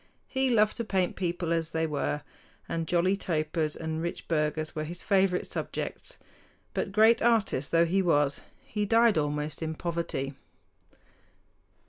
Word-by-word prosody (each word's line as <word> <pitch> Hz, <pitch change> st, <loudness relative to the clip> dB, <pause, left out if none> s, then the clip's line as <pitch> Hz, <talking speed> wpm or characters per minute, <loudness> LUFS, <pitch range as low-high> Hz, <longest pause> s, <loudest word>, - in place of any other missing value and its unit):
He 265 Hz, -1 st, 0 dB
loved 215 Hz, -3 st, +3 dB
to 235 Hz, -, -1 dB
paint 190 Hz, -4 st, 0 dB
people 175 Hz, -2 st, -1 dB
as 165 Hz, -1 st, -1 dB
they 160 Hz, 0 st, 0 dB
were, 150 Hz, -1 st, -2 dB, 0.4 s
and 165 Hz, -1 st, -2 dB
jolly 180 Hz, +3 st, +2 dB
topers 155 Hz, -4 st, -1 dB
and 160 Hz, 0 st, -3 dB
rich 170 Hz, +1 st, -4 dB
burghers 155 Hz, -1 st, -1 dB
were 155 Hz, -, -2 dB
his 170 Hz, +3 st, -6 dB
favorite 190 Hz, -2 st, +2 dB
subjects; -, -, -5 dB, 0.6 s
but, -, -, -2 dB
great 220 Hz, +3 st, +5 dB
artist 220 Hz, -, +2 dB
though 170 Hz, 0 st, +5 dB
he 190 Hz, +4 st, +2 dB
was, 145 Hz, -5 st, +2 dB, 0.2 s
he 210 Hz, -1 st, -2 dB
died 225 Hz, -2 st, +4 dB
almost 150 Hz, +1 st, -2 dB
in 160 Hz, 0 st, -2 dB
poverty. 165 Hz, -5 st, -3 dB
170 Hz, 145 wpm, -28 LUFS, 155-195 Hz, 0.6 s, great